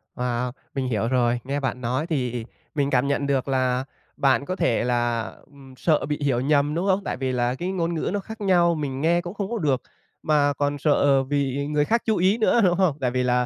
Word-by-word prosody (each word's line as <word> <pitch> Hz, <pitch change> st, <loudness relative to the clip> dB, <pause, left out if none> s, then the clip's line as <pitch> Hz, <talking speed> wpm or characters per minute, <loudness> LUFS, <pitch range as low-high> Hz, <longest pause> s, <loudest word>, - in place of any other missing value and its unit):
Wow! 125 Hz, 0 st, -2 dB, 0.2 s
Mình 130 Hz, -2 st, -1 dB
hiểu 115 Hz, -2 st, 0 dB
rồi. 120 Hz, -1 st, +1 dB
Nghe 140 Hz, +2 st, -2 dB
bạn 130 Hz, -2 st, -3 dB
nói 130 Hz, +7 st, -1 dB
thì 125 Hz, -7 st, -2 dB, 0.3 s
mình 140 Hz, -2 st, +1 dB
cảm 130 Hz, +1 st, +2 dB
nhận 140 Hz, 0 st, 0 dB
được 135 Hz, -1 st, 0 dB
là 130 Hz, -1 st, +1 dB, 0.3 s
bạn 135 Hz, 0 st, +2 dB
có 185 Hz, -, -3 dB
thể 115 Hz, -10 st, +1 dB
là, 120 Hz, -1 st, 0 dB, 0.2 s
ừm, 135 Hz, -2 st, -16 dB
sợ 155 Hz, -3 st, +1 dB
bị 150 Hz, 0 st, -3 dB
hiểu 130 Hz, -4 st, +1 dB
nhầm, 145 Hz, +1 st, +2 dB
đúng 180 Hz, +4 st, -1 dB
không? 190 Hz, +1 st, +2 dB
Tại -, -, -3 dB
vì 130 Hz, 0 st, -2 dB
là 125 Hz, 0 st, 0 dB
cái 180 Hz, +6 st, -3 dB
ngôn 170 Hz, -2 st, -1 dB
ngữ 160 Hz, -, -2 dB
nó 205 Hz, -, 0 dB
khác 220 Hz, +3 st, -9 dB
nhau, 175 Hz, -4 st, +3 dB
mình 140 Hz, -3 st, -3 dB
nghe 170 Hz, +3 st, +3 dB
cũng 175 Hz, +2 st, -7 dB
không 200 Hz, -2 st, -4 dB
có 235 Hz, -, -1 dB
được, 140 Hz, -, 0 dB, 0.4 s
mà 145 Hz, -2 st, +3 dB
còn 145 Hz, +1 st, -1 dB
sợ 140 Hz, -2 st, +3 dB
bị 140 Hz, 0 st, -1 dB
người 150 Hz, 0 st, +1 dB
khác 230 Hz, +5 st, +1 dB
chú 220 Hz, -2 st, +1 dB
ý 190 Hz, +5 st, +3 dB
nữa, 230 Hz, +1 st, +3 dB
đúng 180 Hz, -2 st, +4 dB
hông? 180 Hz, -7 st, +2 dB
Tại 125 Hz, -2 st, 0 dB
vì 125 Hz, 0 st, 0 dB
là, 125 Hz, 0 st, +2 dB
140 Hz, 235 wpm, -24 LUFS, 125-170 Hz, 0.4 s, đúng